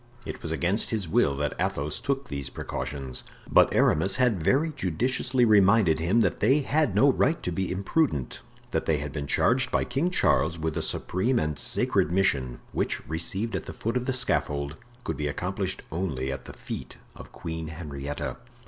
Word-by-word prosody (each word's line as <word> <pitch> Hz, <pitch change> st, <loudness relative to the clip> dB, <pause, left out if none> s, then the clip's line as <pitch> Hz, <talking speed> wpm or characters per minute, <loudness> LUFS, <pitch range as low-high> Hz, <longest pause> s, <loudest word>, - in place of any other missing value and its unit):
It -, -, -6 dB
was 80 Hz, -, -3 dB
against 85 Hz, +7 st, 0 dB
his 105 Hz, -6 st, -1 dB
will 70 Hz, -3 st, +2 dB
that 75 Hz, 0 st, -1 dB
Athos 75 Hz, +1 st, -1 dB
took 140 Hz, -1 st, -2 dB
these 70 Hz, -2 st, -4 dB
precautions, 70 Hz, -3 st, -5 dB, 0.2 s
but -, -, +5 dB
Aramis 95 Hz, +6 st, +3 dB
had 120 Hz, -8 st, +2 dB
very 135 Hz, -, +2 dB
judiciously 125 Hz, +7 st, +1 dB
reminded 100 Hz, -5 st, +5 dB
him 90 Hz, +9 st, +3 dB
that -, -, +1 dB
they 140 Hz, +3 st, +4 dB
had 150 Hz, +2 st, +1 dB
no 140 Hz, +1 st, +6 dB
right 150 Hz, +5 st, +1 dB
to 90 Hz, -, -1 dB
be 95 Hz, +2 st, -2 dB
imprudent, 95 Hz, -, 0 dB, 0.3 s
that -, -, -1 dB
they 80 Hz, -, +3 dB
had 75 Hz, 0 st, -5 dB
been 70 Hz, -2 st, -4 dB
charged 130 Hz, -, +2 dB
by -, -, +1 dB
King 135 Hz, +8 st, 0 dB
Charles 90 Hz, -, +2 dB
with 80 Hz, -1 st, -2 dB
a -, -, -1 dB
supreme 115 Hz, +8 st, 0 dB
and 75 Hz, -2 st, -1 dB
sacred -, -, +2 dB
mission, 65 Hz, -10 st, +1 dB
which, -, -, -2 dB
received 95 Hz, +7 st, -1 dB
at -, -, -3 dB
the -, -, -6 dB
foot 115 Hz, +2 st, -3 dB
of 125 Hz, 0 st, -1 dB
the 130 Hz, -, +1 dB
scaffold, 75 Hz, -, 0 dB, 0.3 s
could -, -, -3 dB
be 75 Hz, -, -1 dB
accomplished 95 Hz, +6 st, -3 dB
only 75 Hz, -6 st, -2 dB
at 70 Hz, -2 st, -6 dB
the -, -, -9 dB
feet -, -, -7 dB, 0.2 s
of -, -, -12 dB
Queen 80 Hz, -1 st, -5 dB
Henrietta. 75 Hz, -3 st, -5 dB
90 Hz, 185 wpm, -27 LUFS, 75-120 Hz, 0.3 s, no